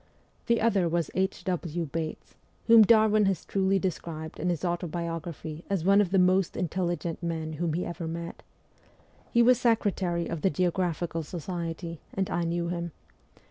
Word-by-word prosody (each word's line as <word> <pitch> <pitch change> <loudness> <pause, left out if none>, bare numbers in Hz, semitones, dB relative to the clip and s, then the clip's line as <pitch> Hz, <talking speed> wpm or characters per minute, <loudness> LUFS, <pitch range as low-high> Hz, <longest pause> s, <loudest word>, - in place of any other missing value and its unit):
The 235 0 +3
other 200 -6 +2
was 170 -2 -1
H. 190 +1 -1
W. 175 -2 -2
Bates, 155 +1 -5 0.3
whom 230 -1 +8
Darwin 215 -1 +5
has 190 -4 -1
truly 195 0 +1
described 165 -4 -4
in 180 - 0
his 175 0 -1
autobiography 170 -2 -4
as 195 -5 0
one 200 +1 +6
of 195 - 0
the 195 - +2
most 185 0 +3
intelligent 175 -1 -2
men 160 -2 -3
whom 160 +1 -1
he 175 +3 -1
ever 170 -1 -5
met. 170 +1 -6 0.9
He 235 - +5
was 250 0 +5
secretary 195 -7 +1
of 165 -2 -4
the 190 - +3
Geographical 175 -1 -1
Society, 170 0 -5 0.2
and 190 -1 -1
I 175 -1 0
knew 170 0 -1
him. 170 -2 -4
175 Hz, 160 wpm, -28 LUFS, 165-190 Hz, 0.9 s, whom